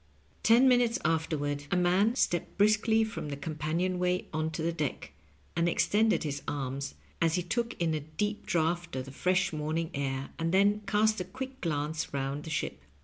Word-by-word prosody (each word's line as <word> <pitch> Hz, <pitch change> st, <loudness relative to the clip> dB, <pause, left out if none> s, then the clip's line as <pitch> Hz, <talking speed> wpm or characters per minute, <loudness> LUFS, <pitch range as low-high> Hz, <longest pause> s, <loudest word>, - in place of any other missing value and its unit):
Ten 240 Hz, +4 st, +6 dB
minutes 245 Hz, -1 st, +4 dB
afterward 145 Hz, -3 st, 0 dB
a -, -, +1 dB
man 185 Hz, +6 st, +3 dB
stepped 175 Hz, -9 st, 0 dB
briskly 215 Hz, +2 st, +4 dB
from 220 Hz, -8 st, -4 dB
the 140 Hz, -, -4 dB
companion 160 Hz, +4 st, -2 dB
way 180 Hz, 0 st, +1 dB
on 155 Hz, +1 st, 0 dB
to 155 Hz, -, -3 dB
the 170 Hz, -, +1 dB
deck, 150 Hz, -5 st, -3 dB, 0.4 s
and 170 Hz, +1 st, +2 dB
extended 215 Hz, +5 st, +2 dB
his 145 Hz, -2 st, -3 dB
arms 140 Hz, 0 st, -3 dB, 0.3 s
as 165 Hz, -1 st, +3 dB
he 180 Hz, -, 0 dB
took 235 Hz, +7 st, -2 dB
in 165 Hz, -2 st, +1 dB
a 155 Hz, -, 0 dB
deep 160 Hz, +8 st, -3 dB
draught 170 Hz, 0 st, 0 dB
of 130 Hz, -1 st, -3 dB
the 135 Hz, -, -9 dB
fresh 185 Hz, +5 st, +1 dB
morning 155 Hz, +2 st, -2 dB
air, 135 Hz, -1 st, -3 dB
and 165 Hz, 0 st, 0 dB
then 200 Hz, +3 st, +4 dB
cast 215 Hz, -1 st, +2 dB
a -, -, -1 dB
quick 260 Hz, +4 st, -7 dB
glance 155 Hz, 0 st, -1 dB
around 140 Hz, +1 st, -3 dB
the -, -, -6 dB
ship. 70 Hz, -, -3 dB
165 Hz, 185 wpm, -30 LUFS, 150-205 Hz, 0.4 s, Ten